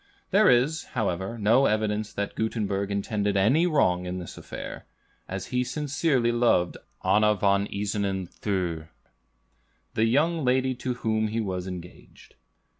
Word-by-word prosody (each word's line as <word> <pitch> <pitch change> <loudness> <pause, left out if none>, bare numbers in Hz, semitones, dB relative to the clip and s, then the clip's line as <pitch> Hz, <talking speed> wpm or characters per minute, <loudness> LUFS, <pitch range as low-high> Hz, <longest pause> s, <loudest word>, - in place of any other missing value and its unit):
There 210 +2 +5
is, 135 +7 +3
however, 95 0 -1
no 115 +6 +4
evidence 105 0 0
that 100 0 -3
Gutenberg 100 -3 -1
intended 100 0 -1
any 130 - +4
wrong 90 - +2
in 90 +1 -3
this 90 -2 -7
affair, - - -8 0.4
as 95 0 -4
he 125 0 +2
sincerely 135 -2 0
loved 120 -7 +2 0.3
Anna 105 0 +4
von 100 0 +2
Isernen 100 -2 -2
Thür, 85 -7 -3 1.1
the 110 - +2
young 155 +7 +2
lady 130 +1 +2
to 125 0 -3
whom 110 -2 0
he 110 +2 -2
was 95 -4 -3
engaged. 90 -1 -10
105 Hz, 135 wpm, -26 LUFS, 95-125 Hz, 1.1 s, There